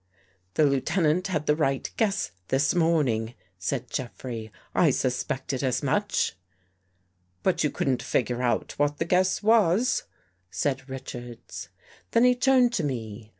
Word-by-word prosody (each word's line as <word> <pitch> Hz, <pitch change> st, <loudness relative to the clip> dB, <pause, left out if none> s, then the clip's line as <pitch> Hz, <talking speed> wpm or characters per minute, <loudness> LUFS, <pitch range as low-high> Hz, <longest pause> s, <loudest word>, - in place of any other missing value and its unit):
The 155 Hz, -, +5 dB
Lieutenant 155 Hz, +5 st, +1 dB
had 155 Hz, -5 st, -1 dB
the 150 Hz, -, +3 dB
right 135 Hz, -4 st, 0 dB
guess 215 Hz, -2 st, 0 dB, 0.2 s
this 135 Hz, +1 st, +2 dB
morn 165 Hz, -4 st, +3 dB
ing," 115 Hz, 0 st, -1 dB, 0.3 s
said 90 Hz, -, -3 dB
Jeffrey. 120 Hz, -3 st, -5 dB
" -, -, -33 dB
I 170 Hz, -, +4 dB
suspected 130 Hz, 0 st, -1 dB
as 130 Hz, 0 st, 0 dB
much." 205 Hz, +9 st, 0 dB, 0.5 s
" 90 Hz, 0 st, -44 dB
But 175 Hz, -3 st, +2 dB
you 150 Hz, -, +2 dB
couldn't 130 Hz, -3 st, 0 dB
figure 125 Hz, 0 st, 0 dB
out 120 Hz, -1 st, 0 dB
what 145 Hz, 0 st, +1 dB
the 165 Hz, -, -1 dB
guess 185 Hz, +3 st, +2 dB
was," 220 Hz, +1 st, +3 dB, 0.4 s
said 135 Hz, +3 st, -2 dB
Richards. 120 Hz, -9 st, -8 dB, 0.4 s
Then 230 Hz, -, +5 dB
he 250 Hz, 0 st, +6 dB
turned 250 Hz, -1 st, +4 dB
to 190 Hz, -, 0 dB
me. 110 Hz, -5 st, -4 dB
140 Hz, 150 wpm, -26 LUFS, 120-180 Hz, 0.5 s, he